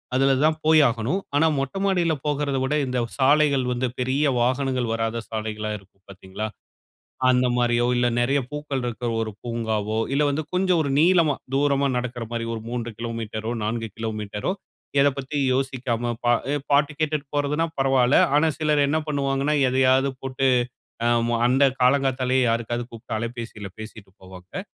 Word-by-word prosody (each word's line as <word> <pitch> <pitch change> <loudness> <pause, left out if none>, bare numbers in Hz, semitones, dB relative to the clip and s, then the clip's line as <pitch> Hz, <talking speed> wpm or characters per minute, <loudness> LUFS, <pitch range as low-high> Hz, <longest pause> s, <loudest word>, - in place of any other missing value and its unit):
அதுல 135 +1 +3
தான் 155 0 +2
போய் 155 0 +6
ஆகணும். 120 - -2 0.2
ஆனா 160 +2 +4
மொட்டை 135 +7 -3
மாடியில 175 -4 +2
போகறத 145 -2 0
விட, 130 +3 -1
இந்த 125 0 -1 0.2
சாலைகள் 140 -1 +3
வந்து 125 +1 -1
பெரிய 130 +4 +1 0.2
வாகனங்கள் 130 -1 0
வராத 115 0 -2
சாலைகளா 110 -1 -4
இருக்கும் 95 0 -27
பாத்தீங்களா, 95 +2 -6 0.8
அந்த 125 0 +3
மாரியோ 120 0 +2
இல்ல 120 - +2
நெறைய 135 +4 +2
பூக்கள் 150 -3 -3
இருக்க 120 0 -5 0.2
ஒரு 110 -1 -4
பூங்காவோ 110 -2 -2 0.2
இல்ல, 145 - +2
வந்து 150 +2 -2
கொஞ்சம் 180 -2 +2
ஒரு 140 - -2
நீளமா 170 -3 +4 0.2
தூரமா 140 0 +2
நடக்கிற 125 -1 -4
மாரி. 115 -1 -2
ஒரு 110 - -7
3 120 -1 -4
கிலோமீட்டரோ, 115 -1 -4
4 115 +1 -2
கிலோமீட்டரோ 110 - -3 0.5
இதப் 140 -1 +3
பத்தி 140 +2 -5 0.2
யோசிக்காம 125 -3 -1
பா 120 - +4 0.4
பாட்டு 145 +1 +3
கேட்டுட்டு 155 -2 -1
போறதுனா 145 +3 +1
பரவால்ல. 135 -1 +3 0.2
ஆனா 155 +2 +4
சிலர் 150 -2 +2
என்ன 155 +3 +1
பண்ணுவாங்கன்னா, 140 0 0
எதையாவது 130 +1 +3
போட்டு 135 0 -1 0.6
அ, - - +3 0.4
அந்த 130 +3 +3 0.2
காலங்காத்தாலேயே 130 0 +2
யாருக்காவது 120 +1 -1
கூப்ட்டு 115 -1 -6
அலைபேசியில 115 -3 -6
பேசிட்டு 110 -2 -10
போவாங்க. 95 - -9
130 Hz, 150 wpm, -24 LUFS, 115-140 Hz, 0.8 s, போய்